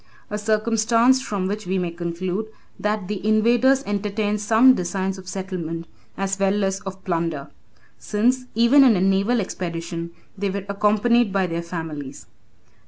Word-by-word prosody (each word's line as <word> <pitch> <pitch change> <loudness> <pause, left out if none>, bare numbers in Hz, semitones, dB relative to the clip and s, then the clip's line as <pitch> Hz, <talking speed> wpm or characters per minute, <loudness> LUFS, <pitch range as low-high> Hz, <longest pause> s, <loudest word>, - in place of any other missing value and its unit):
A 210 - -1
circumstance 225 +4 +2
from 205 -7 -3
which 205 0 -4
we 190 +1 0
may 175 -2 -1
conclude, 175 +4 -3 0.3
that 210 -2 -1
the 205 -2 -4
invaders 240 +5 +3
entertained 205 +1 -1
some 225 +5 +6
designs 190 0 -2
of 185 - -13
settlement 180 -4 -5 0.3
as 195 0 -2
well 195 +1 +2
as 195 0 0
of 190 0 -7
plunder; 165 -5 -2 0.5
since 250 +5 0
even 235 +5 +6
in 245 -5 +6
a - - +1
naval 195 +5 +2
expedition, 170 -3 -4 0.3
they 200 0 -2
were 195 0 -4
accompanied 210 +3 +2
by 190 -1 +1
their 170 -1 -3
families. 160 -5 -6
195 Hz, 150 wpm, -22 LUFS, 180-220 Hz, 0.5 s, some